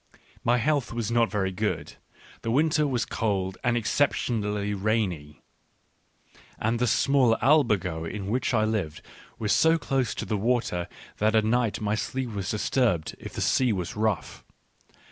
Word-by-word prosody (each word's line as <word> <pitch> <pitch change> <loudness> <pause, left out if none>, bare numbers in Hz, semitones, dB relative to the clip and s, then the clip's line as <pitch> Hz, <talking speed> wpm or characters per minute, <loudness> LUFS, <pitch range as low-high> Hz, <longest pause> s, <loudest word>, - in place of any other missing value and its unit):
My 120 +1 +3
health 140 +2 0
was 115 -1 -3
not 115 -1 +3
very 95 -3 -1
good; 90 - -2 0.5
the 115 - -3
winter 150 +4 +2
was 125 -4 0
cold 95 -4 -2
and 120 -1 +2
exceptionally 105 -4 0
rainy; 95 -8 -2 1.1
and 115 +2 0
the 125 - +2
small 130 0 +3
albergo 105 - +2
in 95 +4 -5
which 120 +6 0
I 110 -3 +2
lived 105 -9 -2 0.3
was 105 -3 0
so 160 +2 +4
close 135 -6 -1
to - - -4
the 105 - -1
water 105 -5 0 0.3
that 110 +1 +2
at 110 -1 +4
night 115 -1 +1
my 105 0 0
sleep 125 +3 -3
was 100 -3 -4
disturbed 105 - 0
if - - -9
the - - -4
sea 130 -2 +2
was 90 -4 -3
rough. 110 0 -2
110 Hz, 155 wpm, -26 LUFS, 100-125 Hz, 1.1 s, so